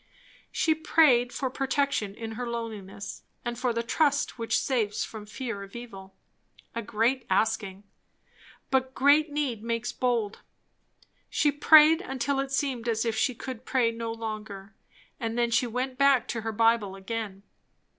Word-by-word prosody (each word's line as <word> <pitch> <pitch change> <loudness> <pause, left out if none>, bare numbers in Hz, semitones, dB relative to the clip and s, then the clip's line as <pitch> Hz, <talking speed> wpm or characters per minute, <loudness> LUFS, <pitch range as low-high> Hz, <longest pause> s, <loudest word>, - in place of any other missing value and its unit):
She 320 - +2
prayed 295 -6 +4
for 260 0 -3
protection 270 -7 -1
in 225 0 -6
her 245 +2 -4
loneliness, 220 -4 -6 0.2
and 240 0 -2
for 250 0 0
the 230 0 -1
trust 285 +1 +1
which 225 -1 +1
saves 225 -6 0
from 215 -2 -9
fear 230 -2 -5
of 195 +2 -11
evil. 195 -5 -10 0.6
A 230 - -3
great 235 +4 0
asking! 200 -1 0 0.9
but 260 0 +1
great 290 +3 +4
need 280 -7 -2
makes 230 +1 -2
bold. 235 -5 -1 0.9
She 295 - +2
prayed, 310 +3 +7
until 270 -4 -2
it 275 0 -2
seemed 265 -4 -1
as 225 0 0
if 225 -1 0
she 240 +3 +1
could 255 0 -7
pray 250 -3 +1
no 230 0 -4
longer; 215 -3 -6 0.5
and 230 -1 -3
then 235 -1 +1
she 245 +2 +2
went 255 +2 -3
back 275 -4 +4
to 230 - -2
her 225 0 -3
Bible 225 -3 +2
again. 200 0 -5
235 Hz, 155 wpm, -27 LUFS, 220-265 Hz, 0.9 s, prayed